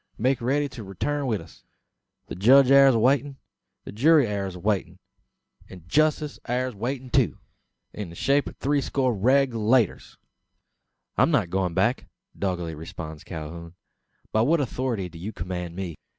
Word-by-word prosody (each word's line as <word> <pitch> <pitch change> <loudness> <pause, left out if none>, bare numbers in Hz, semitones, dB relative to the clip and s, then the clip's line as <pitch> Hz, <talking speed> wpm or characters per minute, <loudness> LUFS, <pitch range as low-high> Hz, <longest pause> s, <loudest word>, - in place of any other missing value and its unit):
make 130 +3 +1
riddy 140 +4 +1
to 120 -4 -9
reeturn 140 +9 -3
wi' 110 -4 +1
us! - - -14 0.6
The - - -8
judge 130 +8 +5
air 140 0 +8
awaitin'; 135 +3 +2 0.5
the - - -8
jury 145 +6 +4
air 100 -3 -2
awaitin'; 95 +2 -2 0.7
an 90 -3 -12
justice 150 - +1
air 125 +1 -1
waitin', 125 +4 -5
too - - +2 0.6
in 105 -4 -6
the 85 - -11
shape 140 +8 +1
o' - - -13
three 145 +1 +1
score 130 -2 0
Reg'lators." 120 -1 +1 1.0
"I'm - - +5
not 85 - +1
going 95 -2 -1
back," 115 +7 +1 0.3
doggedly 90 -4 -3
responds 80 0 -8
Calhoun. 85 +1 -8 0.6
"By 110 - +2
what 155 +8 +3
authority 125 -7 -2
do 85 -1 -12
you 100 +6 -5
command 90 -3 -5
me? 95 -3 -4
115 Hz, 150 wpm, -25 LUFS, 90-135 Hz, 1.0 s, air